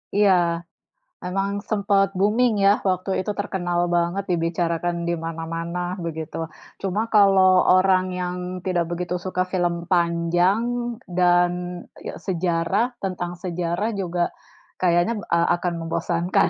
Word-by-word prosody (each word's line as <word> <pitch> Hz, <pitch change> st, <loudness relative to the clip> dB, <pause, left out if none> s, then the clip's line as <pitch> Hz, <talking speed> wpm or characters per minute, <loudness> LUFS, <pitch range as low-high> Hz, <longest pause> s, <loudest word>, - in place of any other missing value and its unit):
Iya, 205 Hz, -1 st, +5 dB, 0.9 s
memang 195 Hz, +2 st, -1 dB, 0.2 s
sempat 200 Hz, -2 st, +2 dB
booming 220 Hz, +4 st, +3 dB
ya, 200 Hz, -, +7 dB, 0.2 s
waktu 185 Hz, +1 st, -1 dB
itu 210 Hz, -, -2 dB
terkenal 175 Hz, -3 st, -1 dB, 0.2 s
banget, 175 Hz, +3 st, 0 dB
dibicarakan 170 Hz, 0 st, 0 dB
di 170 Hz, -, +1 dB
mana-mana, 165 Hz, +1 st, -4 dB, 0.3 s
begitu. 160 Hz, -2 st, -5 dB, 0.4 s
Cuma 195 Hz, +2 st, -1 dB
kalau 190 Hz, -3 st, +6 dB
orang 185 Hz, 0 st, +4 dB
yang 180 Hz, 0 st, -2 dB, 0.3 s
tidak 175 Hz, -2 st, +1 dB
begitu 175 Hz, +1 st, -3 dB
suka 185 Hz, -1 st, -1 dB
film 175 Hz, -2 st, +1 dB, 0.2 s
panjang 175 Hz, +4 st, +2 dB, 0.6 s
dan 175 Hz, 0 st, +4 dB, 0.6 s
ya -, -, -4 dB
sejarah, 175 Hz, +4 st, +1 dB, 0.2 s
tentang 180 Hz, -2 st, -3 dB
sejarah 180 Hz, +3 st, -2 dB
juga 175 Hz, -2 st, -2 dB, 0.6 s
kayaknya, 175 Hz, +5 st, +3 dB, 0.2 s
eee, 170 Hz, 0 st, +3 dB
akan 175 Hz, 0 st, -2 dB
membosankan. 170 Hz, +2 st, +1 dB
180 Hz, 115 wpm, -23 LUFS, 170-195 Hz, 0.9 s, ya